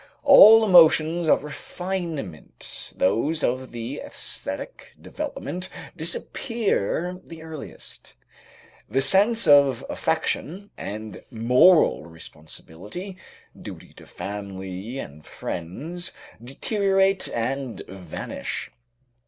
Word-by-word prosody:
All 225 -6 +9
emotions 165 -2 +5
of 150 - +4
refinement, 160 - -6
those 145 - +1
of 130 +1 -1
the 120 +4 -5
esthetic - - -6
development, 275 - -6 0.3
disappear 180 - -2
the 165 -1 -11
earliest. 160 -3 -10 0.7
The 135 +5 +1
sense 205 - +4
of 140 -2 +5
affection 195 +6 -2
and 105 -1 -7
moral 125 - +4
responsibility, 80 - -10 0.4
duty - - -11
to - - -15
family 100 +2 -6
and 75 - -8
friends 150 - -6 0.3
deteriorate 195 - +1
and 130 +1 -3
vanish. 90 -3 -6
150 Hz, 85 wpm, -24 LUFS, -, 0.7 s, All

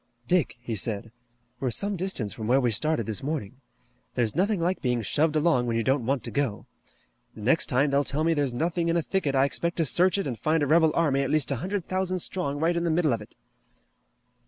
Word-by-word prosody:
"Dick," 175 -8 +1
he 120 -2 -4
said, 110 +2 -3 0.5
"we're 130 - -1
some 200 - -1
distance 170 - -2
from 110 - -6
where 130 +3 +4
we 125 -3 +1
started 150 +1 0
this 110 -2 -3
morning. 135 -4 -4 0.5
There's 120 -2 0
nothing 195 +3 +1
like 180 +3 -1
being 125 -3 0
shoved 155 +8 +1
along 150 -6 +2
when 115 -1 0
you 115 - 0
don't 130 -2 +1
want 135 -1 0
to - - -6
go. 135 -8 -2 0.7
The 110 - -10
next 130 +9 +2
time 140 +1 +2
they 140 0 +3
tell 145 +2 -1
me 165 +1 +3
there's 145 -4 0
nothing 170 +6 -1
in 170 - +2
a 170 - 0
thicket 155 -8 -1
I 135 +1 +4
expect 170 +4 -2
to 165 - +2
search 180 +7 +3
it 195 - -1
and 125 -6 -4
find 155 +3 +1
a - - +3
rebel 160 +2 +4
army 145 -5 +2
at 135 - -1
least 155 -2 +1
a 135 - 0
hundred 185 - -3
thousand 185 0 -1
strong 160 -5 -2
right 165 +2 +1
in 170 - 0
the 170 - 0
middle 160 -4 +2
of 115 - -2
it." 105 - -13
145 Hz, 235 wpm, -26 LUFS, 125-170 Hz, 0.7 s, where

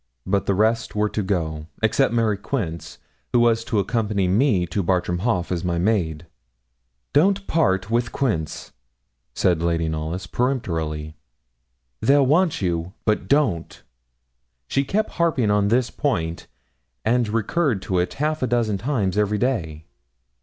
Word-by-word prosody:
But 100 +1 0
the 100 - +2
rest 110 +3 +1
were 105 0 +1
to 105 - -2
go, 80 -5 -2 0.2
except 120 +4 +3
Mary 115 -3 +2
Quince, 95 -6 -4 0.4
who 120 - +5
was 115 -1 +3
to 110 - -1
accompany 100 -2 0
me 100 -1 +2
to 100 +4 -2
Bartram 90 -1 0
Haugh 95 -4 0
as 85 -2 -1
my 85 -1 -1
maid. 85 -5 0 0.9
'Don't 195 +6 +3
part 100 - +1
with 120 0 +1
Quince,' 80 - -2 0.6
said 85 -3 +2
Lady 85 -1 0
Knollys, 80 +3 -3
peremptorily 80 - -2 0.9
'they'll 140 0 +4
want 160 - +2
you, 85 0 -1
but 105 -1 +1
don't.' 135 - 0 0.8
She 135 - +1
kept 215 +10 -1
harping 155 -11 +1
on 105 0 +2
this 120 +3 +1
point, 85 - -2 0.6
and 120 +1 +2
recurred 115 - 0
to 95 -2 0
it 90 - -1
half 155 +2 -1
a 130 - +1
dozen 115 -5 0
times 105 -5 0
every 105 0 +1
day. 85 - -2
105 Hz, 145 wpm, -23 LUFS, 90-125 Hz, 0.9 s, who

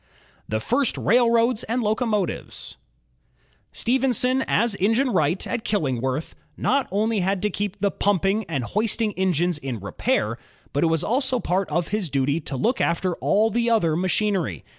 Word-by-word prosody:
The 110 - 0
First 275 - 0
Railroads 235 0 +3
and 235 +2 -1
Locomotives 215 -3 -2 1.0
Stephenson 255 +1 +1
as 235 0 +2
engine 225 +7 +2
wright 170 -1 +1
at 225 - -3
Killingworth 135 - -1 0.2
not 275 0 +1
only 215 +3 0
had 190 +1 0
to 210 - +1
keep 205 +1 -3
the 200 0 +1
pumping 200 +2 +1
and 140 -6 -3
hoisting 215 - 0
engines 180 -3 0
in 130 -5 -5
repair, 100 -4 -1 0.3
but 145 - +1
it - - +4
was 165 -1 +1
also 260 +1 +1
part 190 -1 -1
of 165 +2 -1
his 205 -4 -1
duty 140 +3 0
to 140 -3 -6
look 240 - 0
after 175 +2 0
all 220 +2 +2
the 235 0 +1
other 170 -9 +2
machinery. 180 - 0
200 Hz, 155 wpm, -23 LUFS, 165-230 Hz, 1.0 s, it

